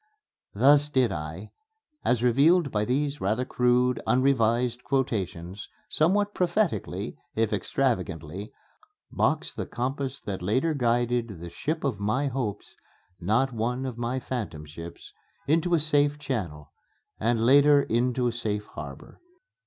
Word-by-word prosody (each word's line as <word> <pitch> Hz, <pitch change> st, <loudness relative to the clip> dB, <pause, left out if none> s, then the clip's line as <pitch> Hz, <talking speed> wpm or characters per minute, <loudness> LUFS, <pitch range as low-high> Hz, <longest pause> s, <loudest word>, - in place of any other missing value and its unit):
Thus 145 Hz, +6 st, +5 dB
did 130 Hz, -4 st, +2 dB
I, 80 Hz, +6 st, -6 dB, 0.5 s
as 120 Hz, -1 st, +1 dB
revealed 140 Hz, +6 st, +4 dB
by 105 Hz, 0 st, 0 dB
these 140 Hz, +4 st, -1 dB
rather 110 Hz, +6 st, 0 dB
crude, 125 Hz, 0 st, +2 dB
unrevised 125 Hz, -2 st, +2 dB
quotations, 100 Hz, -8 st, -2 dB, 0.2 s
somewhat 205 Hz, +6 st, +2 dB
prophetically, 180 Hz, -, -1 dB, 0.2 s
if 110 Hz, -1 st, +1 dB
extravagantly, 100 Hz, -, -2 dB, 0.6 s
box -, -, 0 dB
the -, -, -5 dB
compass 135 Hz, +2 st, -3 dB
that 100 Hz, -3 st, -5 dB
later 130 Hz, -, +1 dB
guided 120 Hz, -, 0 dB
the 85 Hz, 0 st, -8 dB
ship 155 Hz, -, -3 dB
of 130 Hz, -8 st, -1 dB
my 125 Hz, +8 st, 0 dB
hopes 125 Hz, -6 st, -4 dB, 0.5 s
(not 120 Hz, +8 st, +1 dB
one 120 Hz, +3 st, -2 dB
of 125 Hz, -3 st, -5 dB
my 120 Hz, +2 st, -1 dB
phantom 105 Hz, -13 st, -5 dB
ships) 85 Hz, +3 st, -10 dB, 0.3 s
into 165 Hz, +4 st, +2 dB
a -, -, +2 dB
safe 145 Hz, -1 st, +3 dB
channel, 100 Hz, -, -4 dB, 0.5 s
and 115 Hz, +1 st, +1 dB
later 140 Hz, +4 st, +6 dB
into 125 Hz, +2 st, 0 dB
a 120 Hz, -, +2 dB
safe 105 Hz, -3 st, -2 dB
harbor. 70 Hz, -7 st, -10 dB
125 Hz, 130 wpm, -27 LUFS, 105-140 Hz, 0.6 s, later